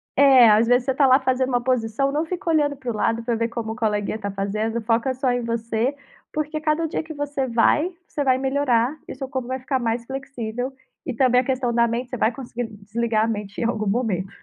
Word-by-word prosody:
É, 265 -4 +7
às 215 +2 +5
vezes, 245 +1 +3
você 270 - +1
está 275 +2 +3
lá 260 0 +6
fazendo 260 -1 0
uma 245 -1 +1
posição, 255 +2 0
não 305 +3 0
fica 345 0 -4
olhando 295 -3 +2
para 260 -2 -6
o 220 - -5
lado 225 +2 0
pra 235 -1 0
ver 230 +1 -1
como 225 -1 -4
o - - -9
colega 210 -3 -1
está 200 -2 -4
fazendo; 215 +4 -2
foca 230 +4 +1
só 260 0 0
em 245 0 -1
você. 230 +3 -1 0.4
Porque 305 0 -2
cada 310 +1 0
dia 310 - -3
que 315 0 -8
você 285 -2 -2
vai, 275 +9 +2 0.2
você 290 - -2
vai 260 -1 +3
melhorar 265 0 +1
e - - -6
o - - -12
seu 265 0 -5
corpo 260 -2 -3
vai 260 0 -3
ficar 260 +1 -1
mais 235 0 -1
flexível. 255 -1 -5 0.3
E 260 - -3
também 250 0 +4
a - - -6
questão 255 -2 -1
da 235 0 +3
mente, 240 +2 -3
você 250 - -4
vai 220 - +2
conseguir 245 -1 -5 0.2
desligar 220 +1 0
a - - -2
mente 210 -3 -4
em - - 0
algum 220 -3 -1
momento. 195 -4 0
245 Hz, 240 wpm, -23 LUFS, 225-270 Hz, 0.4 s, É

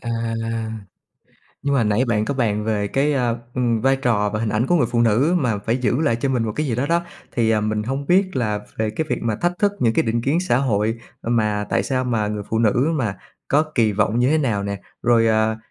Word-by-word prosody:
À, 120 - -5 1.5
nhưng 140 0 0
mà 120 -5 +2
nãy 105 +4 +2
bạn 110 -4 0
có 140 - -2
bàn 105 -4 0
về 105 -2 -1
cái, 140 +6 +1
a, 120 -3 +1 0.2
ừm, 120 -3 +1
vai 135 +1 +3
trò 110 -6 +1
và 110 - -3
hình 115 - -1
ảnh 110 +4 0
của 175 - +2
người 130 -8 +2
phụ 120 - +1
nữ 120 +9 +3
mà 120 -9 0
phải 115 +4 -1
giữ 125 +1 0
lại 115 -8 +2
cho 135 +4 -2
mình 125 -3 +1
một 110 - -2
cái 155 - 0
gì 120 - -1
đó 130 +4 -1
đó, 170 +2 +1 0.3
thì, 115 -2 +1
à, 110 -1 +2
mình 105 0 -1
hông 135 +5 -3
biết 185 -3 +2
là 105 -4 0 0.2
về 110 -1 0
cái 135 +9 -2
việc 125 - -1
mà 110 -2 -1
thách 175 +5 0
thức 205 -1 +2
những 115 -2 +2
cái - - +3
định 115 0 -1
kiến 145 +8 +1
xã 150 -10 +1
hội, 115 -3 0 0.2
mà 105 -3 0
tại - - +2
sao 130 -1 -1
mà 110 -4 0
người 105 -1 -3
phụ 110 - +1
nữ 120 +7 +2
mà 115 -10 -1 0.3
có 145 +3 +4
kỳ 110 -4 +3
vọng 105 +3 +1
như 125 - +3
thế 160 - +3
nào 115 -9 0
nè? 100 0 -4 0.2
Rồi, 115 -1 +4
à, 110 0 +2
115 Hz, 250 wpm, -21 LUFS, 110-135 Hz, 1.5 s, có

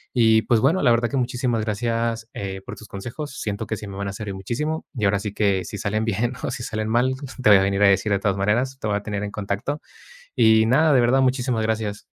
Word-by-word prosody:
y 110 -2 +4
pues, 120 - +2
bueno, 180 +10 +3
la 125 - +5
verdad 115 0 +2
que 140 - -2
muchísimas 125 -2 0
gracias, 115 +1 -2
eh, 95 -1 -5
por - - -7
tus 110 - -13
consejos. 130 +9 -7
Siento 105 +1 -3
que 110 - -3
sí 105 - -8
me 95 - -8
van 100 0 -3
a - - -6
servir 100 -1 -6
muchísimo, 150 - -3
y 110 -4 -1
ahora 100 +1 +3
sí 105 0 -5
que 100 -3 +1
si 105 - -6
salen 110 +3 -1
bien 115 +3 0
o - - -2
si 130 -1 -5
salen 110 -2 -3
mal, 120 +3 +2 0.3
te 110 - +5
voy 105 - +9
a - - +2
venir 100 +1 0
a 105 - +7
decir 100 +2 +2
de 100 - +2
todas 100 -1 0
maneras, 120 +7 0
te 110 - -3
voy 105 - 0
a - - -5
tener 105 -1 -3
en 100 - -4
contacto 105 +9 -3 0.6
y 110 0 +5
nada, 150 +7 +4
de 130 - +5
verdad, 120 +3 +3
muchísimas 125 -3 +1
gracias. 110 -2 -2
110 Hz, 255 wpm, -23 LUFS, 100-120 Hz, 0.6 s, voy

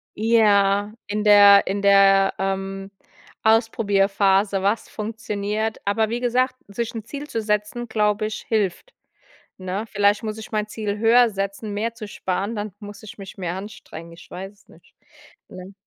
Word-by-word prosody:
Ja. 205 -2 +3
In 210 +1 -2
der 205 -1 +7
in 200 +1 -2
der, 195 -1 +5
ähm, 195 0 -3 0.5
Ausprobierphase, 200 -3 +2
was 205 +3 -1
funktioniert. 215 0 -3
Aber 215 +2 +1
wie 235 +2 -2
gesagt, 255 +1 0
sich 225 +3 -4
'n 225 -2 -6
Ziel 290 +3 -8
zu 225 - -2
setzen, 210 +3 -2
glaube 210 -1 0
ich, 215 - -5
hilft, 215 - -1 0.7
ne? 185 +3 -4
Vielleicht 205 +1 +1
muss 215 0 -4
ich 220 - -9
mein 215 -1 -1
Ziel 210 -1 -4
höher 230 +2 +5
setzen, 200 +1 -4
mehr 225 +3 -2
zu 215 -2 -9
sparen, 200 +3 -3
dann 210 -1 -4
muss 205 -1 -10
ich 210 - -11
mich 195 -1 -10
mehr 180 -2 -3
anstrengen. 190 -4 -9
Ich 165 - -15
weiß 190 +2 -8
es 205 - -28
nicht, - - -21 0.5
ne? 185 +2 -11
205 Hz, 160 wpm, -22 LUFS, 195-220 Hz, 0.7 s, der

